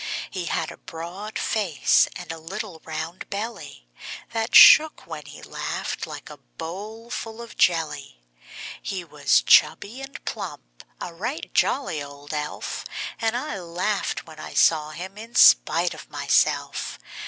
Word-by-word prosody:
He 185 -2 -4
had - - -1
a - - -12
broad 185 +6 -7
face, 190 -10 +2
and 180 -2 -7
a 165 - -7
little 185 +1 -7
round 160 +2 -6
belly 200 - -6 0.4
That 225 0 -1
shook 310 0 +9
when 155 -3 -8
he 145 - -11
laughed, - - -4
like - - -9
a - - -10
bowl 200 - -8
full 225 -1 -5
of 235 -1 -9
jelly. 150 - +1 0.6
He 190 -2 -4
was 150 -3 +2
chubby 235 +7 +4
and 270 0 -9
plump - - -7 0.2
a 170 - -6
right 240 - -5
jolly 165 - +1
old 145 +1 -9
elf; 150 0 -4 0.4
And 225 +1 0
I 250 -6 -4
laughed 180 +4 -2
when 160 -2 -13
I - - -8
saw 155 -2 +4
him 185 +6 -8
in 230 +2 -11
spite - - +6
of - - -12
myself. - - +1
175 Hz, 145 wpm, -24 LUFS, 155-220 Hz, 0.6 s, shook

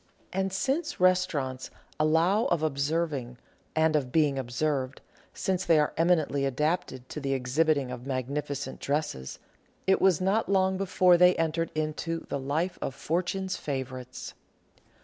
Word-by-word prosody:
And, 190 +1 0
since 270 - -1
restaurants 165 -8 +1 0.3
allow 165 +8 +3
of 165 -3 +1
observing 140 -3 -1 0.4
and 160 0 +3
of 135 -4 0
being 145 -3 +2
observed, 130 +1 -2 0.3
since 190 -1 -1
they 165 - +4
are 150 -1 +2
eminently 160 -4 +2
adapted 135 -2 -1
to - - -5
the 135 -1 -1
exhibiting 135 +1 +1
of 125 +1 -7
magnificent 140 +2 -3
dresses, 140 - -2 0.5
it 190 - +3
was 190 -4 +4
not 195 +4 +1
long 190 -1 +3
before 185 -2 +4
they 180 0 +6
entered 165 0 0
into 155 +2 -2
the 140 - -2
life 155 +7 -2
of 135 - -3
Fortune's 185 +4 -2
favourites. 130 -3 -5
155 Hz, 135 wpm, -28 LUFS, 135-180 Hz, 0.5 s, they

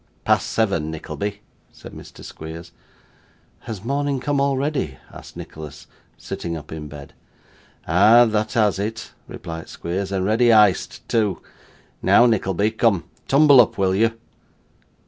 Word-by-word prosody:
'Past - - +2
seven, 100 -9 0
Nickleby,' 100 +6 -5 0.3
said - - -13
Mr. - - -12
Squeers. 80 +1 -9 0.9
'Has 105 -4 -8
morning 140 +2 -1
come 145 +1 -1
already?' 140 - -1 0.2
asked - - -12
Nicholas, 75 -2 -10 0.3
sitting 85 -1 -5
up 75 -1 -11
in 80 -1 -7
bed. 70 -1 -11 0.7
'Ah! 105 +8 +6
that 110 -1 -1
has 105 -4 +2
it,' 110 +2 -5 0.2
replied 80 -1 -8
Squeers, 95 +3 -4
'and 95 -1 -1
ready 115 +3 +3
iced 105 -4 +2
too. 105 -4 0 0.6
Now, 120 - +5
Nickleby, 105 -2 +1
come; 110 -5 +1 0.2
tumble 140 -2 +7
up, 115 - -1
will 95 -1 +1
you? 115 +3 +1
105 Hz, 130 wpm, -21 LUFS, 85-115 Hz, 0.9 s, tumble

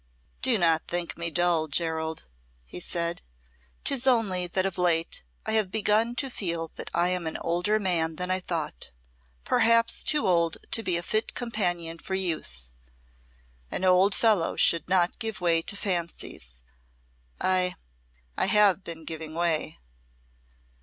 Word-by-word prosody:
"Do 255 -3 +4
not 165 -3 +2
think 175 0 -3
me 170 0 -3
dull, 170 -1 +2
Gerald," 160 +1 -1 0.4
he - - -8
said; 170 -1 -2 0.6
"'tis 270 -1 +1
only 200 -8 +3
that 185 +2 0
of 190 -2 -3
late 170 -2 +2 0.2
I 220 - -2
have 215 -3 +2
begun 220 +3 +1
to 270 +1 -2
feel 170 -6 -2
that - - -6
I 175 +1 +2
am 180 -2 -2
an 160 - -3
older 180 +5 +1
man 170 -5 +1
than 180 +2 -2
I 185 - +2
thought 165 - -4 0.5
perhaps 230 - +3
too 300 -1 +2
old 170 -3 +2
to 225 - +2
be 180 -5 +1
a 170 - -2
fit 215 +5 -1
companion 175 -8 -2
for 190 - -4
youth. 65 - -2 1.0
An 190 - -2
old 185 +2 +4
fellow 210 -8 +2
should 170 +1 +3
not 180 -1 +1
give 225 -3 -3
way 170 -2 +2
to 200 - -3
fancies. 170 - -4 0.8
I 185 -1 +2 0.6
I - - +1
have 205 -2 +4
been 165 -2 -8
giving 160 -1 -5
way." 165 -2 -1
175 Hz, 150 wpm, -27 LUFS, 165-200 Hz, 1.0 s, Do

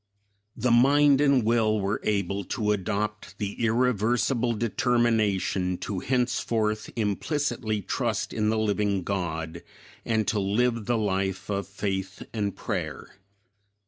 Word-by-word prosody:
The 120 +2 +1
mind 140 +3 +5
and 140 -4 +4
will 110 -1 +2
were 100 +1 -1
able 100 -1 0
to 105 -1 -1
adopt 105 +2 -2
the 105 +2 -4
irreversible 120 +1 +2
determination 110 -5 +1
to 95 0 -4
henceforth 115 -4 0
implicitly 110 0 -1
trust - - -2
in 110 -1 +1
the 110 - +1
living 105 -3 0
God 85 -3 -3 0.4
and 110 -2 0
to 105 - +1
live 115 +3 +1
the 120 -1 +2
life 95 -2 -1
of 100 0 -2
faith 95 -1 -4
and 105 -3 -2
prayer. - - -4
105 Hz, 120 wpm, -26 LUFS, 100-120 Hz, 0.4 s, mind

